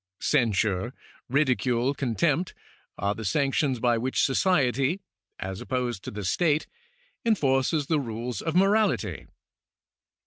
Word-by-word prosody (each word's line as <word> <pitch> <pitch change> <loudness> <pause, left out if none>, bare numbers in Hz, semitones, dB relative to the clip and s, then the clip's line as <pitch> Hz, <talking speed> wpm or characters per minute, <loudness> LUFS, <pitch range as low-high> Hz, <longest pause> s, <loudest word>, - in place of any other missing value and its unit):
Cen 120 -7 +2
sure, 100 +3 -1 0.3
ridicule, 130 -2 +2
contempt, 145 +6 0 0.4
are 100 +1 0
the 110 - -7
sanctions 135 +4 +1
by 120 -1 +2
which 130 +3 +1
society 140 - +2 0.4
(as 95 +1 -5
opposed 125 -6 -2
to - - -5
the 105 -2 -6
state) 155 - +2 0.6
enforces 145 - +2
the 155 +1 +1
rules 120 -1 -4
of 160 0 -3
morality. 205 +3 +2
130 Hz, 115 wpm, -26 LUFS, 115-150 Hz, 0.6 s, Cen